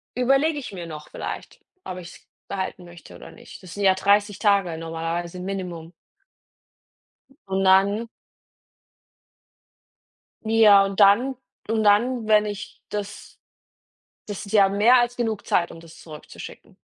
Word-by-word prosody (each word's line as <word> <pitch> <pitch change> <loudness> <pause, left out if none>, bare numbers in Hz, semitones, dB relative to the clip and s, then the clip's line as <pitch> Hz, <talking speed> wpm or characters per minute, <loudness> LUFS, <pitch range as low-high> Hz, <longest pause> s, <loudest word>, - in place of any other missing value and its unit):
überlege 275 +5 +2
ich 270 - -8
mir 180 -3 -7
noch 150 -1 -9
vielleicht, - - -7 0.2
ob 185 - -7
ich 175 -2 -9
es - - -19 0.2
behalten 185 -2 -5
möchte 175 -1 -14
oder - - -12
nicht. 235 -2 -14
Das 180 - -11
sind 205 - -4
ja 190 -1 +5
30 205 +1 +2
Tage 195 -6 +2
normalerweise 165 +2 -5
Minimum. 180 -3 -6 1.6
Und 195 0 -1
dann 200 +4 +3 2.4
Ja, 215 -3 +6
und 195 +1 -5
dann 230 +7 +5 0.3
und 220 -1 +1
dann, 220 +3 +2
wenn 215 -1 +4
ich 205 0 -7
das 205 -1 -7 0.9
das 205 0 -6
ist 200 - -10
ja 200 -2 +5
mehr 215 +6 +5
als 240 0 -2
genug 225 -3 -2
Zeit, 170 - +1
um 165 - -11
das 165 -1 -15
zurückzuschicken. 155 -2 -12
200 Hz, 140 wpm, -23 LUFS, 180-220 Hz, 2.4 s, Ja